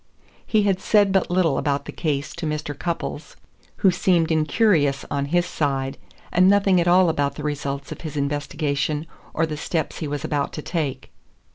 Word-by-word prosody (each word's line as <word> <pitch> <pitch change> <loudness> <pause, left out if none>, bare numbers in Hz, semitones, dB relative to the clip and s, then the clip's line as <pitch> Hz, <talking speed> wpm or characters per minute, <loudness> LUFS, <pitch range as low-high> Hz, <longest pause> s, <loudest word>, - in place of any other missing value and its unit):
He 215 -2 +3
had 195 -2 +1
said 205 -2 +4
but 190 -1 +2
little 175 -4 +2
about 140 -1 -1
the - - -6
case 145 -3 -2
to 160 - -3
Mr. 150 -1 -3
Cupples, 170 +2 -4 0.5
who 190 - +7
seemed 175 -2 +2
incurious 155 -3 +2
on 140 -1 0
his 175 +4 +1
side, 135 -5 -1 0.4
and 185 +2 +5
nothing 195 -2 +4
at 170 - -1
all 180 +1 +5
about 145 -3 0
the 150 - -7
results 140 -1 -3
of - - -7
his 155 -3 -6
investigation 145 +1 -1 0.3
or 160 - +2
the 155 -1 -5
steps 160 +1 -2
he 155 - -3
was 145 -1 -4
about 145 -1 -1
to 150 - -6
take. 145 -7 -3
155 Hz, 180 wpm, -23 LUFS, 145-175 Hz, 0.5 s, who